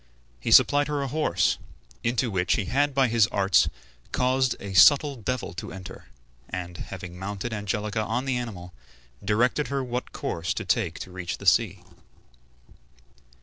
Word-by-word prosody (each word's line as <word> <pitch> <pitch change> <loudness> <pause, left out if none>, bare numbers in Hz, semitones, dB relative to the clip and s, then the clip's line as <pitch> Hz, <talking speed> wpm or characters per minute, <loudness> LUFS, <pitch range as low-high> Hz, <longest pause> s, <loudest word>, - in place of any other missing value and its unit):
He - - -3
supplied 145 0 +6
her 145 -2 -1
a - - -2
horse, 135 - +1 0.4
into 120 0 0
which 90 -2 +1
he 105 - -1
had 140 +7 +1
by 135 -1 +4
his 115 -2 +3
arts 100 -2 +3 0.4
caused 130 0 +1
a 100 -1 -7
subtle 145 - +6
devil 125 -1 -3
to 90 - -7
enter, 95 0 -10 0.4
and, 90 -1 -5
having 90 -2 -8
mounted 100 +4 -4
Angelica 105 +1 -2
on 120 +4 -2
the 135 -2 0
animal, 95 -8 -6 0.5
directed 120 +8 +1
her 140 -1 -2
what 125 0 -4
course 85 +2 -3
to - - -4
take 95 -2 0
to 95 - -8
reach 90 -1 -5
the 100 - -11
sea. 95 -1 +3
110 Hz, 155 wpm, -26 LUFS, 95-130 Hz, 0.5 s, supplied